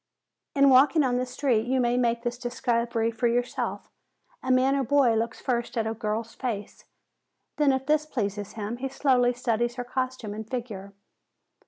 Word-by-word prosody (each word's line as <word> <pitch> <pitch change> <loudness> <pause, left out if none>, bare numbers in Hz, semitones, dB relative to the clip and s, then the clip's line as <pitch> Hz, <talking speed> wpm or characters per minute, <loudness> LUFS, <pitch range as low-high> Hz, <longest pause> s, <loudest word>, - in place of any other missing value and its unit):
In 275 -1 +6
walking 280 +4 +5
on 250 -2 +1
the 255 0 -1
street 250 -3 0
you 260 +1 +1
may 240 -1 +2
make 235 -1 +1
this 240 0 -3
discovery 235 -2 -1
for 230 +2 0
yourself. 245 +1 -2 0.5
A - - -5
man 260 +2 +4
or 275 - +1
boy 265 -2 +3
looks 225 +1 -1
first 240 -2 -2
at 225 - +1
a 220 - -1
girl's 225 0 -3
face, 220 -6 -5 0.7
then 295 -2 +4
if 265 0 -1
this 305 +1 +1
pleases 205 -5 -3
him 220 +1 -4
he 270 +2 -3
slowly 255 -2 +2
studies 240 -1 -1
her 245 - -4
costume 255 -3 -3
and 220 +1 -7
figure. 210 -6 -6
245 Hz, 175 wpm, -26 LUFS, 225-260 Hz, 0.7 s, In